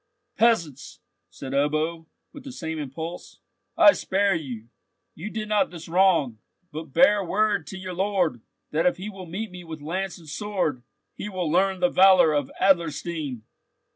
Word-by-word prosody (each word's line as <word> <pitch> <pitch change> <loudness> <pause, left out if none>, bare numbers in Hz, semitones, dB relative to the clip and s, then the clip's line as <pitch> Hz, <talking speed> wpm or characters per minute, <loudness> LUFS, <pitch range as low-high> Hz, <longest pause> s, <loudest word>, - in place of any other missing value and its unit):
"Peasants!" 170 - +1 0.3
said 130 +8 -8
Ebbo, 155 +3 0 0.3
with 285 - -11
the 270 - -8
same 160 -8 -5
impulse, 160 +5 -7 0.4
"I 325 -2 +9
spare 195 +1 +1
you. 125 -9 -6 0.4
You 180 +7 -7
did 215 0 -5
not 210 -1 +2
this 170 -2 -10
wrong. 165 - +2 0.3
But 155 -1 -7
bear 210 - +5
word 205 +3 0
to 190 - -7
your 185 -1 -6
lord, 180 - 0 0.3
that 160 +3 +2
if 180 - +1
he 200 +4 -6
will 190 -2 -10
meet 200 +6 -5
me 180 0 -9
with 160 -2 -8
lance 185 +6 -4
and 165 -3 -16
sword, 180 -6 -2 0.3
he 210 - -6
will 180 -5 -2
learn 190 +2 +2
the 180 - +5
valour 185 -4 +6
of 145 -3 0
Adlerstein." 165 - 0
175 Hz, 165 wpm, -25 LUFS, 155-195 Hz, 0.4 s, I